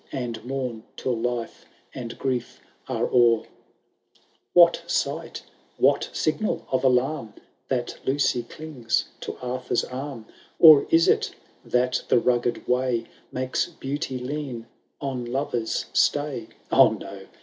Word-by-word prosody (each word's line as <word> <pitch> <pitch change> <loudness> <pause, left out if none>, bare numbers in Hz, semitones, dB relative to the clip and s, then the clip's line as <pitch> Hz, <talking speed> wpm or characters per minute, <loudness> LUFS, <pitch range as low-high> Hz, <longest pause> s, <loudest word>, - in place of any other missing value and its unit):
And 120 -5 -4
mourn 125 -3 -3 0.2
till 125 - -1
life 120 0 -3 0.3
and 120 -3 -7
grief 125 -3 -2 0.3
are - - 0
o*er. 120 -2 +4
VL - - -22 1.1
What 170 -1 +6
sight, 160 -1 -2 0.3
what - - +3
signal 185 +8 -1
of 130 - +2
alam^ 130 -2 +1 0.3
That 125 -2 -2
Lucy 135 -2 +1
clings 125 -2 -3
to - - -6
Arthur*s 125 -1 -1
arm? 130 -3 -6 0.3
Or 155 -4 +9
is 165 0 +5
it, - - +2 0.3
that 125 +1 +1
the - - +4
rugged 120 0 0
way 125 -2 +1 0.3
Hakes 130 0 -1
Beauty 145 -3 -4
lean 130 -2 -5 0.3
on 135 -3 -3
lover*s 120 -2 -2
stay? - - +1 0.2
Oh, - - +6
no - - -9
125 Hz, 125 wpm, -25 LUFS, 120-140 Hz, 1.1 s, Or